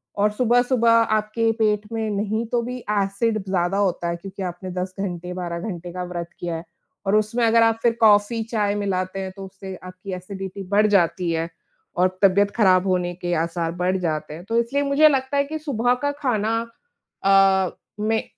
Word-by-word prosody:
और 205 +1 +2
सुबह-सुबह 245 +1 +3
आपके 225 0 +2
पेट 210 -1 +3
में 220 -1 -1
नहीं 210 +3 -1
तो 240 -1 +2
भी 250 +2 -5
एसिड 205 +2 +1
ब 195 - -7
ज़्यादा 180 +1 +1
होता 185 -4 0
है, 170 - -1
क्योंकि 195 +3 -9
आपने 180 +1 -5
10 185 +1 -4
घंटे, 180 -2 -4
12 175 -2 -4
घंटे 175 -1 -6
का 180 - -4
व्रत 175 -1 -5
किया 170 -1 -3
है। 165 - -5 0.4
और 200 - +3
उसमें 215 +3 +1
अगर 230 0 +5
आप 225 0 +2
फिर 235 -1 +4
कॉफ़ी-चाय 215 0 +3
मिलाते 195 -2 -2
हैं, 190 -1 -4
तो 195 -1 -7
उससे 190 0 -9
आपकी 185 +1 -8
एसिडिटी 190 +1 -6
बढ़ 210 +1 +4
जाती 175 -1 +2
है 165 +1 -1 0.5
और 180 +1 +5 0.2
तबीयत 200 +1 +4
खराब 190 -4 +4
होने 180 -1 0
के 175 0 -3
आसार 165 0 -2
बढ़ 185 +1 +2
जाते 155 -4 -3
हैं। 170 - -10
तो 230 +2 -1
इसलिए 275 +5 0
मुझे 285 +2 +5
लगता 270 0 0
है 280 - +4
कि 310 +2 -5
सुबह 245 -5 +1
का 285 - +2
खाना 240 -7 -1 0.7
अ, 195 -1 +4 0.3
में 220 +1 0
200 Hz, 190 wpm, -23 LUFS, 185-225 Hz, 0.7 s, अगर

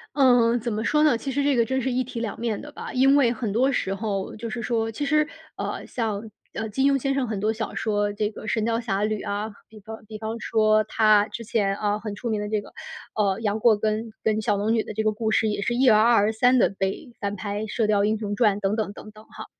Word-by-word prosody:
嗯， 245 -4 +4
怎 235 - -3
么 215 0 -2
说 300 +5 +2
呢？ 295 -6 +4
其 270 +4 -4
实 285 +2 0
这 280 -1 +2
个 235 - +4
真 260 +3 -1
是 260 +1 -1
一 255 +1 0
体 245 -1 -6
两 225 -3 -4
面 230 -2 -2
的 295 - -9
吧。 - - -8
因 270 +2 +4
为 250 -5 +4
很 225 -2 -3
多 255 +7 +2
时 195 -6 -1
候， 200 -1 -3
就 230 +1 -6
是 235 +2 -4
说 225 -2 -1
其 285 +6 -3
实 305 +1 +3 0.3
呃， - - -4
像 220 -2 -3 0.2
呃， 220 - -4
金 270 +6 +2
庸 275 - +1
先 275 +2 0
生 270 -2 0
很 215 -3 -3
多 215 +2 +1
小 220 0 -4
说， 205 -1 0
这 210 0 -1
个 215 - -10
《神 220 0 0
雕 230 +1 0
侠 210 -4 -1
侣》 215 -1 -1
啊， 205 +2 -2 0.2
比 215 -1 -13
方 220 +2 -10
比 215 0 -8
方 220 +1 -4
说， 215 -1 +2
他 215 -1 +4
之 235 - -7
前 205 -3 0
啊， 210 0 -1
很 210 -1 -6
出 235 +3 -5
名 215 -2 -1
的 210 - -4
这 215 -1 +1
个 - - -15 0.4
呃， 200 -1 +1
杨 210 -1 -1
过 220 -1 +4
跟 220 +2 -1
跟 215 0 +1
小 210 -2 +1
龙 215 +3 +1
女 225 - +2
的 - - -7
这 220 +1 -1
个 215 0 +1
故 220 +1 -2
事， 220 0 +2
也 205 -1 -2
是 240 - 0
一而再、再而三 230 0 +4
地 - - +4
被 195 +6 -4
翻 200 -1 -3
拍， 205 0 -4
《射 225 - +1
雕 205 -1 +2
英 215 +1 +1
雄 205 -1 -3
传》 210 -4 +3
等 200 +2 0
等 215 -3 -2
等 215 - -11
等 215 +1 -15
哈。 - - -10
220 Hz, 295 characters per minute, -24 LUFS, 210-235 Hz, 0.4 s, 嗯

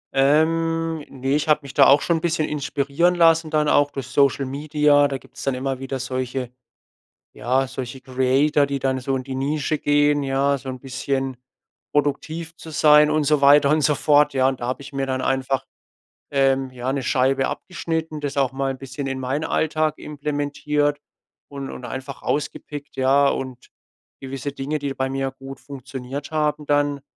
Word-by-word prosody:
Ähm, 165 +3 +2
ne, 135 0 -2
ich 150 - -1
habe 150 -1 +3
mich 140 0 -9
da 140 - +6
auch 140 +1 +6
schon 170 - +1
'n - - -5
bisschen 160 -2 0
inspirieren 145 +4 0
lassen 165 -2 +4
dann 150 -1 +1
auch 145 0 +4
durch 135 -3 -6
Social 135 +1 +2
Media. 145 +1 +2
Da 140 -1 -3
gibt's 130 - -14
dann 135 -2 0
immer 135 0 -3
wieder 135 0 -4
solche 130 -1 -3 0.8
ja, 130 +2 0
solche 130 0 -7
Creator, 135 +3 +2
die 140 0 -2
dann 130 -1 -1
so 135 +1 -1
in 130 - -4
die 135 - -6
Nische 145 +3 -1
gehen, 145 0 +2
ja, 140 +1 +1
so 135 0 -9
'n 130 -1 -5
bisschen 135 0 -3 0.6
produktiv 155 +3 -1
zu 160 - -11
sein 150 -1 +5
und 155 -1 +1
so 150 0 +2
weiter 140 0 +6
und 155 +1 +3
so 145 +1 +3
fort, 150 -1 +4
ja. 130 0 +3
Und 135 -1 -3
da 120 - -3
habe 130 +2 -3
ich 140 - -11
mir 135 -1 -2
dann 130 -1 -2
einfach, 135 0 -1 0.7
ähm 135 -1 +2
ja, 130 +1 -3
'ne 135 -1 -2
Scheibe 135 +1 +2
abgeschnitten, 160 -3 -4
das 145 -1 -4
auch 135 -2 +1
mal 135 0 -1
'n 135 - -7
bisschen 135 +1 -6
in 135 -1 -3
meinen 130 +4 -2
Alltag 155 -1 0
implementiert 145 0 -1 0.5
und 140 -1 -6
und - - -9
einfach 130 +2 -7
rausgepickt, 145 0 -4
ja 135 +2 +4
und 130 -2 -5 0.5
gewisse 135 +1 -5
Dinge, 145 +3 -3
die 140 -1 -3
bei 130 0 -2
mir 135 0 -2
gut 135 0 -10
funktioniert 135 +1 -7
haben 150 -1 0
dann 145 -1 +1
140 Hz, 185 wpm, -22 LUFS, 135-150 Hz, 0.8 s, da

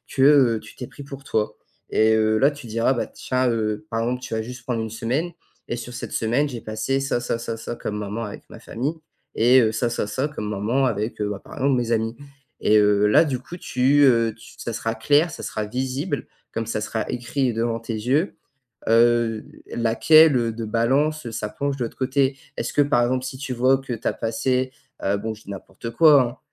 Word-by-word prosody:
que, 135 - +1
heu, 135 -5 +5
tu - - -14
t'es 125 - -6
pris 135 +2 -11
pour 140 0 -9
toi 110 -4 -1 0.3
et 110 0 +3
heu 110 0 +2
là 140 +5 +4
tu 145 -4 -11
diras, 115 +4 +1
bah 120 - -1
tiens 130 -1 -1
heu, 110 +4 -1
par 115 - -2
exemple, 125 +2 -1
tu 125 -2 -6
vas 110 - 0
juste 125 +2 -8
prendre 115 -3 -2
une 110 - -4
semaine, 125 +10 -2 0.4
et: - - -1
«sur 120 +1 -7
cette 125 - -6
semaine 125 +6 +1
j'ai 120 - -6
passé 110 +5 -1
ça, 135 -2 0
ça, 120 -1 -1
ça, 115 -1 -4
ça, 115 +1 -6
comme 105 - -5
moments 105 +2 -4
avec 105 - -8
ma - - -11
famille, 135 +8 -3 0.4
et 125 +3 +6
heu, 110 -2 +2
ça, 115 +2 0
ça, 115 -3 -2
ça, 130 +7 -1
comme 150 -8 -6
moments 110 +7 0
avec 110 0 -3
heu, 105 - 0
bah, 100 -1 -4
par - - -12
exemple 135 -2 +2
mes 120 -1 -2
amis». 115 0 0 0.4
Et 110 - +4
heu, 105 0 +4
là 105 +9 +6
du 135 -4 -1
coup, 170 +7 -10
tu 135 -2 +2
heu 115 -4 +4
tu 115 - -15
ça 115 - -5
sera 115 +1 -2
clair, 145 +8 +3
ça - - -8
sera 110 -1 -3
visible 130 - -3 0.3
comme 115 - -3
ça 105 -1 -2
sera 110 +1 -3
écrit 125 +1 -1
devant 115 0 -1
tes 115 0 -5
yeux, 130 - 0 0.5
heu, 115 -1 +3 0.3
laquelle, 135 +6 +5
heu, 115 -1 0
de 115 +1 -5
balance, 135 +8 +1
heu, 115 - -5
ça 110 -2 -4
penche 140 +3 -2
de 125 - -2
l'autre - - -9
côté. 135 +1 +1 0.2
Est-ce - - -3
que 145 - +4
par 140 -4 +2
exemple, 130 +1 0
si 130 0 -6
tu 140 -1 -5
vois 130 +2 +3
que 135 -2 -5
tu 115 - -4
as - - +1
passé, 125 +3 -1 0.3
heu 100 +1 +1
bon 110 +2 -4
je 110 - -14
dis - - -14
n'importe 100 +3 -7
quoi 130 -2 +5
120 Hz, 230 wpm, -23 LUFS, 110-135 Hz, 0.5 s, et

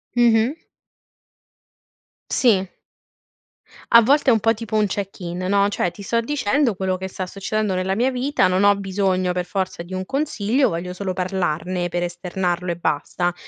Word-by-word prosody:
Mh-mh. 240 +3 +3 1.7
Sì. 200 -7 +3 1.2
A 235 - +9
volte 275 +3 +4
è - - +6
un 220 - +1
po' 225 +2 +3
tipo 225 -1 -5
un 215 -1 +3
check-in 190 -3 -5
no, 200 +2 +2
cioè 180 -3 -1
ti 200 - -12
sto 230 +4 0
dicendo 255 -1 +1
quello 185 0 -1
che 190 - -5
sta 190 0 -5
succedendo 200 +2 -2
nella 185 +1 -1
mia 250 +4 +1
vita, 255 -4 +1
non 185 +2 +1
ho 205 0 +6
bisogno 190 -2 0
per 180 0 -2
forza 190 -2 -3
di 175 +2 -9
un 185 0 -2
consiglio, 265 -1 0
voglio 170 +2 -3
solo 185 +1 -4
parlarne 180 -1 -2
per 175 0 -2
esternarlo 175 0 -2
e - - -2
basta. 175 +2 -1
190 Hz, 165 wpm, -21 LUFS, 180-225 Hz, 1.7 s, A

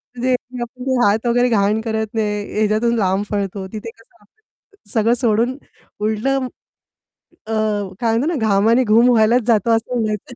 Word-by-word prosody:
तर 240 - -8
ते 255 -1 +3 0.3
आपले 250 +2 -4
हात 215 +4 +1
वगैरे 245 +1 +2
घाण 210 0 +1
करत 220 -1 -2
नाही, 210 -1 -2
याच्यातून 215 +2 +1
लांब 195 0 +1
पळतो, 195 -1 -3
तिथे 215 +1 -6
कसं 225 - -25
आपण 415 - -32
सगळं 225 +1 +2
सोडून 235 +3 +1 0.4
उलटं 250 +5 0 1.0
अ, 225 - -3 0.5
काय 225 -1 +1
म्हणतो 270 +7 0
ना - - -1
घामाने 220 +5 +3
घूम 235 +2 +4
व्हायलाच 235 +1 +4
जातो 230 -1 +2
असं 235 +3 -5
म्हणायचं. 215 +2 -3
225 Hz, 155 wpm, -19 LUFS, 210-245 Hz, 1.0 s, घूम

